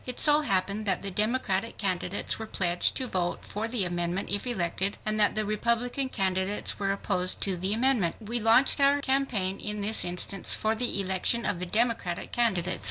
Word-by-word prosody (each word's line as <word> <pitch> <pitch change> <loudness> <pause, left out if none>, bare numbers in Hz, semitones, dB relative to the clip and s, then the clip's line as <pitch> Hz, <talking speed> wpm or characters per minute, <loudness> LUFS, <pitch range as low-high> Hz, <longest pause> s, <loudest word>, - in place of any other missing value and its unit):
It 250 -1 -4
so 300 0 +6
happened 200 -3 -1
that 195 - 0
the 195 - -3
Democratic 215 0 -1
candidates 185 0 -2
were 220 - -6
pledged 175 -4 0
to 260 - -1
vote 180 -6 -3
for 215 +2 -4
the 225 -5 -1
amendment 175 +2 -3
if 205 +4 -2
elected, 195 -3 -2
and 215 0 -1
that 210 - +4
the 215 0 0
Republican 235 +5 0
candidates 190 -1 0
were 195 -1 0
opposed 185 -2 0
to 195 -2 0
the 185 +3 -2
amendment. 225 -6 +1
We 230 +2 -3
launched 230 +6 +5
our 280 +1 +4
campaign 255 -9 -1
in 210 0 -4
this 215 +2 +3
instance 180 +2 0
for 220 0 0
the 225 -3 -1
election 195 +4 +1
of 200 -4 -2
the 180 - -4
Democratic 215 -4 -1
candidates. 190 -7 0
205 Hz, 185 wpm, -27 LUFS, 185-235 Hz, -, so